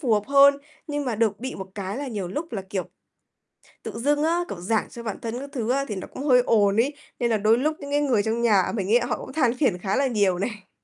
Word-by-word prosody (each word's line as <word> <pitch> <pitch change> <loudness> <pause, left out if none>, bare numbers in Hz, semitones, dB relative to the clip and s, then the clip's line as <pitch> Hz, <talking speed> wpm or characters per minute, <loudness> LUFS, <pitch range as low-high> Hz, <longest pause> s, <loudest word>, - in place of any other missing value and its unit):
phù 250 -8 +1
hợp 210 - +3
hơn. 280 0 +6 0.3
Nhưng 290 -2 -3
mà 245 -4 -1
được 215 -2 0
bị 260 +1 -4
một 190 0 -7
cái 200 +2 -4
là 285 -2 -4
nhiều 200 -6 -4
lúc 300 - -5
là, 195 -3 -3
kiểu, 190 -2 -2 1.0
tự - - -5
dưng 290 +4 +1
á, 340 +2 +2
kiểu, 175 - -6
giảng 215 +4 0
cho 235 - -9
bản 215 -3 -4
thân 235 +2 -4
các 280 +1 -7
thứ 240 -2 -1
á 275 +1 +1
thì 210 - -4
nó 185 - -6
cũng 270 - -8
hơi 250 -4 +5
ồn 205 -3 +3
ấy, 265 +6 +2 0.3
nên 240 - +1
là 225 - +2
đôi 215 +3 +3
lúc 305 +5 0
những 285 -1 -8
cái 290 - +2
người 240 -8 +2
trong 225 +1 -1
nhà 205 -6 +3
mình 195 -3 -2
ấy 240 - +6
họ 245 - -2
cũng 265 - -9
than 250 -7 +2
phiền 255 -11 +2
khá 190 +2 -2
là 275 - +2
nhiều 200 -7 +1
này. 205 -1 -5
235 Hz, 275 wpm, -24 LUFS, 205-275 Hz, 1.0 s, hơn